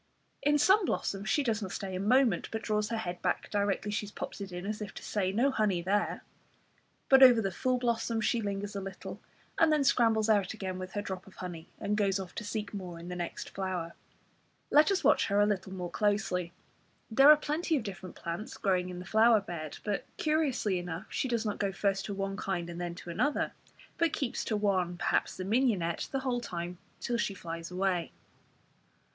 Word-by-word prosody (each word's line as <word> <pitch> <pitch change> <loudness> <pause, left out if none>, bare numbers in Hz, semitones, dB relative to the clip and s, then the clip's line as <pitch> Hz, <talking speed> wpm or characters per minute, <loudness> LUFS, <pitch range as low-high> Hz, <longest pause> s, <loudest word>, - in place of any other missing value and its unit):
In 295 +1 +3
some 385 +8 +5
blossoms 200 - -2
she 290 - +3
does 225 -4 0
not 190 -3 -4
stay 195 -1 -4
a - - -2
moment, 245 +5 +3
but 220 -1 -3
draws 210 0 0
her 230 - -1
head 180 -5 -4
back 180 - -1
directly 205 0 0
she 210 0 -2
has - - -10
popped - - -6
it 195 -1 -6
in, 180 +1 -5
as 215 +1 -3
if 205 -2 -6
to - - -8
say 190 -3 0
"No 245 +8 +2
honey 200 -8 +1
there." 205 +3 0 0.8
But 270 0 +7
over 250 -3 +9
the 195 -3 0
full 255 +7 0
blossoms 235 -2 0
she 235 - +1
lingers 200 0 -3
a 200 - -2
little, 195 0 -7 0.4
and 325 -1 +5
then 300 -2 +3
scrambles 225 -5 +3
out 205 -2 +2
again 190 -3 -4
with 185 0 -7
her 205 - -2
drop 190 -2 -6
of 195 - -15
honey, 175 -2 -7
and 210 - 0
goes 200 -2 +1
off 185 -2 -7
to - - -5
seek 210 0 -4
more 180 -4 -6
in 170 +1 -8
the 180 - -4
next 175 -1 -5
flower. 185 -3 -3 0.8
Let 300 +1 +6
us 390 - +1
watch - - +4
her 200 0 +2
a 205 - +6
little 195 -2 -1
more 180 -2 -5
closely. 190 -4 0 0.6
There 270 +6 +7
are 305 - +10
plenty 305 +2 0
of 255 - -3
different 190 -3 -7
plants 170 +6 -5
growing 185 -3 +1
in 180 - -6
the 180 - -7
flower 220 +2 +5
bed, 170 -6 -6
but, 205 -2 -1
curiously 285 - +1
enough, 175 -1 -5
she - - -1
does 235 -2 -1
not 210 - -2
go 200 -1 0
first 195 0 0
to 205 - -4
one 195 0 -3
kind 175 -4 -2
and 170 +1 -6
then 175 -1 -3
to 175 -1 -8
another; 290 - 0 0.5
but 330 -2 +2
keeps 270 -7 -2
to 215 - 0
one, 185 -4 +1
perhaps - - 0
the 185 - -4
mignonette, 200 -7 +1
the 270 - -1
whole 250 -2 -1
time 175 -4 -5 0.2
till 240 - -1
she 205 -4 -1
flies 165 -2 -6
away. 180 -2 0
200 Hz, 215 wpm, -31 LUFS, 185-230 Hz, 0.8 s, are